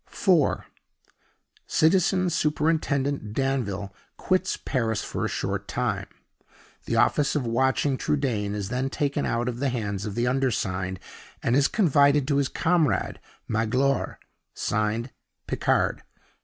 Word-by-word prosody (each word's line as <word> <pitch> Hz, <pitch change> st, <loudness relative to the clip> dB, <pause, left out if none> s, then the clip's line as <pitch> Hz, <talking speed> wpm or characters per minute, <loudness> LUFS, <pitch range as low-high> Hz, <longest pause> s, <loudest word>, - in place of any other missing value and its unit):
(4.) 175 Hz, -8 st, +2 dB, 1.0 s
Citizen 185 Hz, +3 st, +3 dB
Superintendent 145 Hz, -6 st, 0 dB
Danville 110 Hz, -7 st, -1 dB, 0.2 s
quits 185 Hz, 0 st, 0 dB
Paris 115 Hz, -5 st, -1 dB
for -, -, -4 dB
a -, -, -1 dB
short -, -, -3 dB
time. -, -, -2 dB, 0.8 s
The -, -, -1 dB
office 145 Hz, 0 st, +3 dB
of 145 Hz, -4 st, 0 dB
watching 130 Hz, +3 st, +1 dB
Trudaine 115 Hz, -8 st, -1 dB
is 100 Hz, -1 st, -3 dB
then 125 Hz, +3 st, -1 dB
taken 145 Hz, 0 st, -1 dB
out 120 Hz, +1 st, -1 dB
of 120 Hz, -1 st, -3 dB
the 140 Hz, 0 st, +1 dB
hands 105 Hz, -4 st, -3 dB
of 100 Hz, -, -5 dB
the 120 Hz, -, +1 dB
undersigned, 100 Hz, -8 st, -1 dB, 0.4 s
and 115 Hz, -, +2 dB
is 140 Hz, 0 st, +4 dB
confided 145 Hz, -, +3 dB
to 140 Hz, -, +2 dB
his 140 Hz, -1 st, +2 dB
comrade, 160 Hz, -, +1 dB, 0.3 s
Magloire. 125 Hz, +5 st, 0 dB, 0.4 s
Signed, 110 Hz, +4 st, -1 dB, 0.3 s
PICARD. -, -, +1 dB
130 Hz, 125 wpm, -26 LUFS, 110-145 Hz, 1.0 s, is